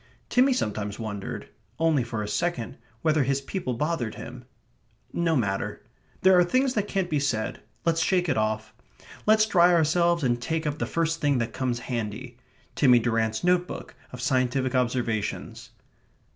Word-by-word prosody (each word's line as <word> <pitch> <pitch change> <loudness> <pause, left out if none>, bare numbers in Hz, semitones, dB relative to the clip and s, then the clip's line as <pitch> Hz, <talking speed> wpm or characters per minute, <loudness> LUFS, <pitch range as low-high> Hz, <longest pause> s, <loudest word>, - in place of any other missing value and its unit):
Timmy 260 +2 +4
sometimes 105 - -2
wondered 105 -3 -5 0.3
(only 160 -5 +2
for 115 -2 -4
a - - -4
second) 130 -1 -2 0.2
whether 155 -1 +3
his 135 +1 +1
people 135 -2 -4
bothered 145 -4 -2
him.... 125 +1 -9 0.7
No 165 -1 +1
matter. 105 -4 -1 0.4
There 190 0 +6
are - - +6
things 255 +8 +1
that 210 -3 -1
can't 195 -3 -1
be 150 -4 0
said. 120 -6 -2 0.2
Let's 165 -1 +2
shake 180 +2 +2
it - - +1
off. 110 0 -1 0.5
Let's 215 0 +6
dry 180 -4 +5
ourselves, 170 0 +3
and 120 -2 +1
take 160 +4 -2
up 150 +1 -2
the - - -1
first 165 0 -1
thing 145 -2 +2
that 115 -1 -2
comes 125 -2 -1
handy.... 120 0 -5 0.4
Timmy 125 -4 +5
Durrant's 115 -2 0
notebook 180 0 0 0.2
of 125 - -8
scientific 130 +1 +1
observations. 120 -4 -2
135 Hz, 160 wpm, -26 LUFS, 115-170 Hz, 0.7 s, There